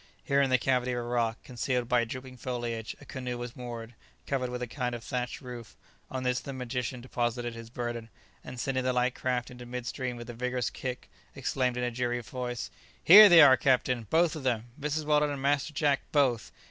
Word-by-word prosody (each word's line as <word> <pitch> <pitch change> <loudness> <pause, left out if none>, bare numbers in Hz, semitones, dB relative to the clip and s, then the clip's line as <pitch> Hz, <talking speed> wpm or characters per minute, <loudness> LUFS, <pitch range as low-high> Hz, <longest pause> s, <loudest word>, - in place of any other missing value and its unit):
Here 140 0 +2
in 135 - +2
the 130 - +4
cavity 125 0 +1
of - - -2
a - - -1
rock, 120 -2 0
concealed 125 0 -2
by 120 -1 +3
drooping 130 +2 -8
foliage, 120 -3 -4
a - - -14
canoe 125 -2 -5
was 120 0 -6
moored, 120 -1 -7 0.3
covered 130 -2 -1
with 125 0 -4
a - - -3
kind 125 0 -3
of 115 - -8
thatched 125 +1 -3
roof; 125 -3 -9 0.3
on 130 -1 -4
this 125 -1 +1
the 140 - -7
magician 125 0 -4
deposited 120 -1 -2
his 115 -1 -9
burden, 120 -1 -5 0.3
and 125 - -8
sending 130 0 -1
the 130 0 +1
light 125 0 +1
craft 125 -1 -2
into 125 -1 -10
mid 125 0 -5
stream 125 -1 -3
with 120 - -8
a 120 - -6
vigorous 125 0 -2
kick, 130 -1 -5 0.3
exclaimed 130 -2 -1
in 125 - -1
a 125 - 0
cheery 120 0 -1
voice, 125 0 -5 0.3
"Here 205 +4 +11
they 170 -2 +9
are, 135 -3 +9
captain! 125 -4 +1
both 165 +3 +3
of 155 - -5
them! 120 -3 -1
Mrs. 150 +1 -2
Weldon 150 0 +3
and 140 -1 -4
Master 140 +2 +1
Jack, 145 -1 +1
both! 130 -6 +2
125 Hz, 210 wpm, -29 LUFS, 120-130 Hz, 0.3 s, Here